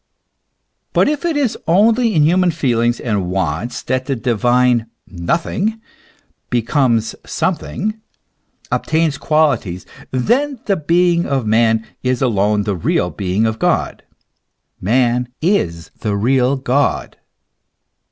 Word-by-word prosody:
But - - +3
if 300 +2 -1
it 330 -3 0
is 270 -6 0
only 220 +5 +3
in 155 - +4
human 180 +3 +3
feelings 120 -7 0
and 105 -6 -2
wants 90 +4 -2
that 130 +1 -2
the 135 - 0
divine 120 0 +2
" - - -53
nothing" 170 - -2 0.7
becomes 120 -2 +1
something, 210 +4 -2 0.7
obtains 160 -3 0
qualities, 135 - 0 0.2
then 250 - 0
the 200 - +2
being 170 +1 +2
of 135 -4 -1
man 110 0 +2 0.2
is 125 -1 0
alone 105 -4 +1
the 100 -1 -1
real 90 +1 0
being 100 +2 -1
of 110 0 -2
God, - - 0 0.8
man 120 +3 +1
is 85 - -1
the 105 -3 -1
real 125 +5 +2
God. 135 +1 -1
125 Hz, 120 wpm, -17 LUFS, 110-170 Hz, 0.8 s, in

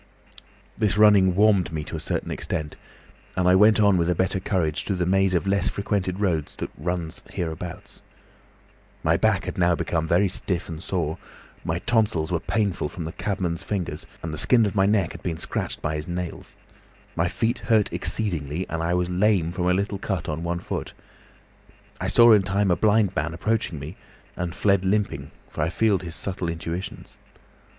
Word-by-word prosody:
"This 105 -3 +1
running 100 -4 +6
warmed 100 -3 +4
me 80 -1 -3
to - - -7
a - - -3
certain - - -2
extent, 75 -1 -4 0.6
and 90 0 +1
I 90 - +6
went 105 +3 +6
on 100 -3 +5
with 85 0 +1
a 90 - +2
better 95 +2 0
courage 85 -6 -1
through 100 - -2
the 90 -1 0
maze 95 +1 +2
of 85 - 0
less 100 -1 +1
frequented 100 -2 -2
roads 85 -7 -1
that - - -5
runs 85 +1 -3
hereabouts. 85 0 -6 1.0
My - - +3
back - - +2
had - - -5
now 85 -1 +4
become 80 -1 -1
very 90 +5 +3
stiff 90 -1 -1
and 80 -1 -7
sore, 85 -4 -2 0.4
my 80 - -1
tonsils 105 -6 +1
were 85 - +1
painful 100 -6 -1
from 85 - -6
the 80 - -4
cabman's 90 -5 -2
fingers, 95 -5 -4 0.2
and 80 -1 -4
the 75 - -2
skin 120 -3 +5
of 100 - -1
my 95 -2 +3
neck 100 -5 +2
had - - -10
been 85 -3 -3
scratched - - -3
by 80 -2 -1
his 75 - -5
nails; 90 -1 -5 0.6
my 85 - +1
feet 115 +7 -1
hurt 110 -3 +2
exceedingly 85 -5 -2
and 80 - -2
I 85 +2 +1
was 90 0 +1
lame 90 -2 +2
from 90 0 -2
a 90 - +4
little 100 +1 -1
cut 95 -4 -3
on 80 +1 -3
one 85 0 -2
foot. - - -5 1.1
I - - -2
saw 120 0 +7
in 105 - +6
time 95 0 +1
a - - +4
blind 105 -1 +2
man 85 - -1
approaching 105 -2 -1
me, 75 +6 -8 0.4
and 90 -1 -4
fled 100 -2 +2
limping, 100 +2 0 0.2
for - - -5
I - - +1
feared 100 0 +2
his 85 -2 -6
subtle 90 -3 -3
intuitions. 85 +2 -6
90 Hz, 190 wpm, -24 LUFS, 85-100 Hz, 1.1 s, saw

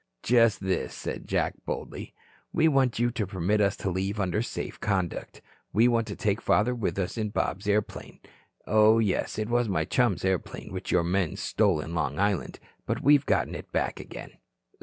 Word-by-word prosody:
"Just 115 -3 +4
this," 95 -1 -2
said - - -6
Jack, - - 0
boldly, - - -6 0.4
"we 160 -1 +3
want 135 -5 +2
you 120 +1 +2
to 110 -5 -2
permit 100 +2 0
us 100 -1 +2
to 95 - -2
leave 95 +3 -2
under 100 +2 0
safe 120 - -5
conduct. 95 -5 -2 0.3
We 115 +3 +5
want 115 -2 +1
to - - -5
take 105 -2 0
father 120 +3 +2
with 115 -5 -2
us 95 +4 -2
in 105 -1 -1
Bob's 100 -1 -2
airplane. 105 0 -2 0.5
Oh, 110 +2 +5
yes, 105 -4 0
it 110 0 -1
was 120 -1 +1
my 80 -5 0
chum's 105 -6 +1
airplane 95 -1 -2
which 95 0 -4
your 90 - +3
men 90 -1 0
stole 100 -7 +1
in 80 +2 -5
Long 75 -3 -1
Island. 100 -1 0 0.3
But - - -2
we 145 - +6
have 145 -1 +3
gotten - - +1
it - - -8
back - - -1
again." - - -9
105 Hz, 190 wpm, -27 LUFS, 95-115 Hz, 0.5 s, we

